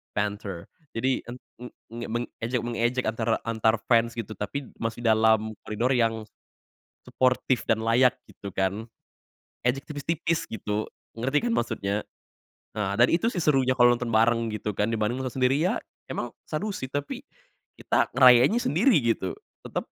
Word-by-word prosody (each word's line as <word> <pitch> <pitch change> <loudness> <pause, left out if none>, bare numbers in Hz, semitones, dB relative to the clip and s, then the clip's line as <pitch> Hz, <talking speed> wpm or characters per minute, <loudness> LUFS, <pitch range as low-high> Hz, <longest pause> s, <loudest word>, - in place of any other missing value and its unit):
banter. 100 -4 -3 0.3
Jadi, 130 +3 0
en 120 +1 -7 0.3
mmm, 120 -1 -9
mengejek 120 0 -3
mengejek 120 +2 0
antara 110 0 0
antar 110 0 +2
fans 115 -1 +4
gitu. 110 -1 -4
Tapi 130 +6 -4
masih 115 +1 -3
dalam 110 0 +3
koridor 115 +5 0
yang 115 -2 +1 0.8
suportif 130 -2 +1
dan 110 0 +1
layak 125 +2 +4
gitu 100 -1 -9
kan. 100 +5 -1 0.8
Ejek 130 +3 0
tipis-tipis 160 +2 -2
gitu, 105 0 -3 0.3
ngerti 135 - 0
kan - - +1
maksudnya. 105 - -1 0.8
Nah 100 -1 -1
dan 120 - +6
itu 170 +7 +2
sih 175 -7 -2
serunya 135 -4 +3
kalau 120 -1 +6
nonton 120 -2 -4
bareng 115 +1 +3
gitu 105 0 -3
kan 105 - +1
dibanding 110 +3 0
nonton 130 -2 -4
sendiri 130 +3 +3
ya, 185 +8 +1 0.3
emang 120 - -3 0.2
seru 165 +8 -3
sih. 130 - -4
Tapi 145 0 -4 0.6
kita - - +1
ngerayainnya 130 - +7
sendiri 190 - +3
gitu. 115 -5 0 0.3
Tetap - - -3
120 Hz, 145 wpm, -26 LUFS, 110-130 Hz, 0.8 s, ngerayainnya